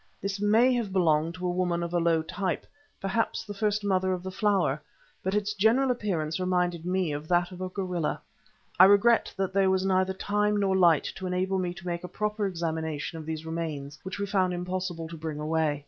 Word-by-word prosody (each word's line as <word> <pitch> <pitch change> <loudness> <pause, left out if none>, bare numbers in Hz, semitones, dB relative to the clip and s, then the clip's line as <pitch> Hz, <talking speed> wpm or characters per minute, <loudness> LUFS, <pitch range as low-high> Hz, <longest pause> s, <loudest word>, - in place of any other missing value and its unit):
This 200 0 -3
may 225 +5 +4
have 235 -5 -1
belonged 165 -3 +2
to 180 0 -5
a 180 - +1
woman 175 -1 0
of 170 0 -4
a 175 - +3
low 165 -1 +2
type, 185 +3 -3 0.3
perhaps 195 +4 -1
the 205 - -6
first 210 0 0
Mother 190 -2 +1
of 180 -1 -4
the 190 - -5
Flower, 185 -8 +1 0.4
but 190 +2 -1
its 210 0 0
general 230 +6 +3
appearance 175 -10 -2
reminded 180 -2 0
me 185 -3 0
of 145 +1 -5
that 175 +1 +2
of 180 0 -9
a 185 - -3
gorilla. 180 -4 -2 0.6
I 185 - +11
regret 205 +4 +5
that 190 -1 -1
there 195 -1 +3
was 190 0 +1
neither 190 0 +2
time 210 +2 0
nor 195 -1 +2
light 170 -5 +5
to 190 - -4
enable 185 +1 0
me 180 -1 -2
to 190 0 -11
make 175 -1 -3
a - - -4
proper 210 +1 -1
examination 160 -3 -3
of 155 - -9
these 160 0 -4
remains, 150 -4 -4
which 190 - -6
we 200 - -1
found 190 -2 +1
it - - -2
impossible 180 -2 -3
to 165 0 -8
bring 155 -1 -5
away. 155 -1 0
185 Hz, 215 wpm, -28 LUFS, 165-195 Hz, 0.6 s, I